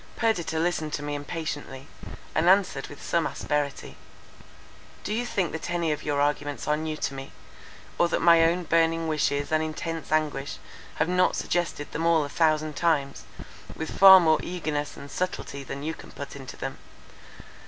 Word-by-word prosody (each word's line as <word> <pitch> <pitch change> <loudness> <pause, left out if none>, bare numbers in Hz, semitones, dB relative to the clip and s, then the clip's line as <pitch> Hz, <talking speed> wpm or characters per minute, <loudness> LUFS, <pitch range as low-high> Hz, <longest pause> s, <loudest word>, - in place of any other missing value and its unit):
Perdita 180 -8 0
listened 160 -2 0
to 145 - -3
me 145 0 -3
impatiently, 145 -2 -5 0.5
and 165 +3 +3
answered 185 -8 +3
with 145 - -12
some 170 -1 +1
asperity:—"Do 145 +7 -6
you 240 +2 -1
think 190 -7 -1
that 160 - -5
any 170 -2 0
of 150 - -2
your 145 -1 -1
arguments 145 0 -1
are 150 - +3
new 155 0 -3
to 140 - -2
me? 135 0 -8 0.7
or 175 - +5
that - - 0
my 170 -1 +6
own 170 +2 +2
burning 165 0 +2
wishes 145 -2 0
and 155 0 +3
intense 160 +1 -4
anguish 155 -2 0 0.4
have - - +1
not 180 +1 +2
suggested 170 -4 -2
them 165 +1 -1
all 165 -2 +4
a 145 - -5
thousand 155 -1 +1
times, 145 -4 0 0.5
with 160 - -5
far 190 -1 +10
more 160 -3 +3
eagerness 155 -5 -3
and 140 - -10
subtlety 180 -6 -3
than 135 +1 -6
you 160 +2 -2
can - - -12
put 140 0 -8
into 135 -2 -9
them? - - -5
155 Hz, 170 wpm, -26 LUFS, 145-170 Hz, 0.7 s, far